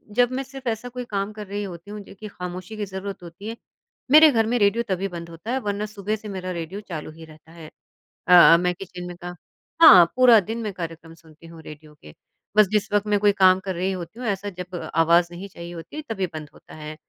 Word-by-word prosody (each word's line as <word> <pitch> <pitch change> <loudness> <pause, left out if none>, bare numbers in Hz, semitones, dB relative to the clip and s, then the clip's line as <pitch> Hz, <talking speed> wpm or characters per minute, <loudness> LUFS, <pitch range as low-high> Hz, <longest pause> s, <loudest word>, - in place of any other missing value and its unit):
जब 245 0 +3
मैं 265 +1 -3
सिर्फ़ 270 -1 -10
ऐसा 230 +2 -4
कोई 250 0 -7
काम 200 +1 -2
कर 210 -1 -9
रही 205 +1 -4
होती 180 0 -9
हूँ 210 - -7
जो 200 - -14
कि 215 - -7
ख़ामोशी 180 +1 -8
की 210 - -3
ज़रूरत 190 -1 -7
होती 175 +5 -10
है 230 - -7 0.5
मेरे 310 0 +8
घर 225 -3 +2
में 245 +2 +1
रेडियो 205 +3 +2
तभी 190 +1 -1
बंद 170 -2 -8
होता 170 +8 -8
है 265 - 0
वरना 205 -2 -3
सुबह 215 0 -4
से 215 0 -10
मेरा 185 -2 -5
रेडियो 175 +4 -6
चालू 160 -6 -7
ही 160 +1 -13
रहता 155 +1 -18
है। 165 -2 -12 0.6
अ 180 - +5
अ, 170 -1 +9
मैं 180 +1 0
किचन 180 -1 -9
में 175 - -8
का 175 0 -8 0.5
हाँ 185 - +10
पूरा 250 -3 +7
दिन 220 +4 -5
मैं 210 -3 -4
कार्यक्रम 165 -2 -8
सुनती 165 0 -18
हूँ 165 -1 -13
रेडियो 150 0 -13
के। 75 - -14 0.4
बस 215 -2 +7
जिस 210 -2 0
वक़्त 205 0 +1
मैं 205 -1 +2
कोई 205 0 +4
काम 185 -1 +5
कर 190 - -3
रही 185 +3 -1
होती 185 +4 -7
हूँ 250 - -4
ऐसा 200 0 -2
जब 180 -1 -8
अ 175 - -5
आवाज़ 170 +1 +4
नहीं 180 +3 -8
चाहिए 170 -1 -10
होती 165 - -10
है 310 - -4
तभी 195 -4 -2
बंद 155 -2 -7
होता - - -16
है। 155 0 -8
190 Hz, 250 wpm, -23 LUFS, 170-210 Hz, 0.6 s, हाँ